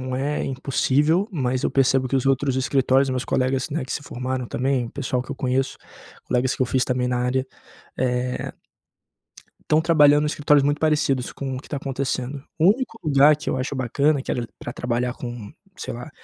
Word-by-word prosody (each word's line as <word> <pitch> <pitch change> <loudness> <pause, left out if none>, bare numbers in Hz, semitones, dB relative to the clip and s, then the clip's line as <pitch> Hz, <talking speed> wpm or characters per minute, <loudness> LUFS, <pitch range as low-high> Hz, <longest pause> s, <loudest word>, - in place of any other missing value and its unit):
não 130 - -2
é 145 +3 -1
impossível, 145 +7 +1
mas 130 -4 -1
eu - - +1
percebo 135 -1 +2
que 135 - +1
os 130 - 0
outros 135 0 +1
escritórios, 135 0 +2
meus 125 -1 -2
colegas, 130 +2 0
né, 150 -1 -2
que 130 - -5
se - - -3
formaram 130 -2 -4
também 130 -1 0
o - - -9
pessoal 130 -2 -2
que 130 - -12
eu - - -3
conheço, 130 +1 -1 0.5
colegas 125 +1 0
que - - -13
eu - - +1
fiz 125 +1 +1
também 125 -1 0
na 125 0 0
área, 130 +2 0 0.5
eh 125 0 -1 1.2
estão 155 +1 +4
trabalhando 150 -3 +5
nuns 150 - 0
escritórios 145 -1 +3
muito 145 +1 +1
parecidos 150 -5 +1
com 135 -1 -5
o 130 - -5
que - - -16
tá 145 - -3
acontecendo. 135 0 -3 0.2
O 165 +3 +5
único 255 -1 -6
lugar 145 0 +5
que 150 - -4
eu - - -1
acho 130 +2 -3
bacana, 140 +3 +1
que - - -5
era 120 -2 -2
pra 120 - -6
trabalhar 125 0 -1
com, 120 -4 -7 0.2
sei - - -5
lá, 120 +5 -8
130 Hz, 205 wpm, -23 LUFS, 125-145 Hz, 1.2 s, trabalhando